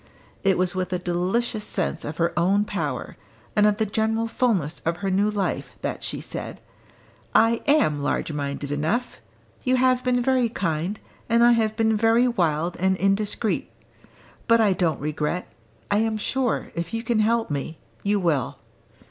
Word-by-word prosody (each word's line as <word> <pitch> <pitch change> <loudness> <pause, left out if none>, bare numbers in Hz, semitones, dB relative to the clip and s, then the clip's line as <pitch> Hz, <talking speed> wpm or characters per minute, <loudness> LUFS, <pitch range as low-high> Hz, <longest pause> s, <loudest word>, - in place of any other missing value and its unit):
It 195 -1 +3
was 180 0 +1
with 185 -1 -2
a - - +1
delicious 185 +6 -1
sense 175 -5 -2
of 150 +2 -5
her 170 0 +1
own 195 +4 +2
power, 150 -11 -4 0.4
and 210 0 +5
of 210 -1 +2
the 220 - +1
general 220 +2 0
fulness 205 - 0
of 165 +1 -2
her 195 - +1
new 200 +3 +2
life, 205 -2 -2
that - - -3
she - - -3
said, - - -6 0.8
"I 230 0 +4
am 280 - +3
large 145 +2 -1
minded 140 -1 -4
enough! 160 +13 -1 0.4
You 255 -1 +2
have 255 0 +3
been 245 -1 +1
very 255 -2 +2
kind, 175 0 -2 0.3
and 230 +1 +4
I 240 - +7
have 220 -2 +2
been 220 -1 +2
very 225 +3 +4
wild 170 -6 0
and 190 +1 +1
indiscreet. 205 +3 0 0.8
But 230 0 +5
I 210 -3 +4
don't 170 -3 0
regret: 150 +4 -2 0.4
I 205 - +4
am 220 0 0
sure, 250 +3 -1
if 170 +5 -4
you 225 - -3
can 235 -2 +1
help 225 -2 +1
me, 145 +3 -3 0.2
you 205 0 +1
will." 160 -8 0
205 Hz, 170 wpm, -24 LUFS, 170-230 Hz, 0.8 s, I